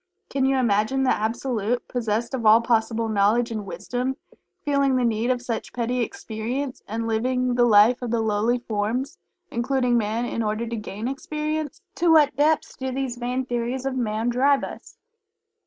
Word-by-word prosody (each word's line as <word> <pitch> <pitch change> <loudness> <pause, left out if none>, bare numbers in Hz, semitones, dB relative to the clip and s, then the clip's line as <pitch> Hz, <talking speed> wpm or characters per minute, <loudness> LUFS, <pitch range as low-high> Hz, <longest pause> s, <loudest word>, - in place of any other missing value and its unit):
Can 270 -1 +1
you 270 0 +2
imagine 235 +2 +2
the 260 - +3
Absolute, 230 +1 -1
possessed 235 0 -2
of 255 -3 -2
all 220 +1 +7
possible 230 -1 +1
Knowledge 220 +3 +2
and 215 -3 -4
Wisdom, 245 +9 -3 0.5
feeling 280 -2 +2
the 250 -1 +2
need 230 +1 0
of 250 -1 0
such 235 -3 -4
petty 245 +1 -1
"experience," 250 - -4
and 225 +2 -3
living 250 +3 0
the 240 0 +4
life 225 +3 +5
of 245 - -3
the 235 0 +1
lowly 220 +2 +1
forms 235 +3 -2 0.3
(including 245 0 +1
Man) 220 +2 -1
in 230 - -2
order 215 +1 -1
"to 235 0 -4
gain 210 +1 -5
experience?" 305 +4 -3
To 340 0 +3
what 300 -4 +5
Depths 300 +3 +1
do 265 0 -4
these 260 -2 -3
vain 250 +2 -2
theories 245 +2 -2
of 270 -1 -1
Man 225 -1 -1
drive 270 +3 +3
us? - - -9
240 Hz, 170 wpm, -24 LUFS, 220-260 Hz, 0.5 s, all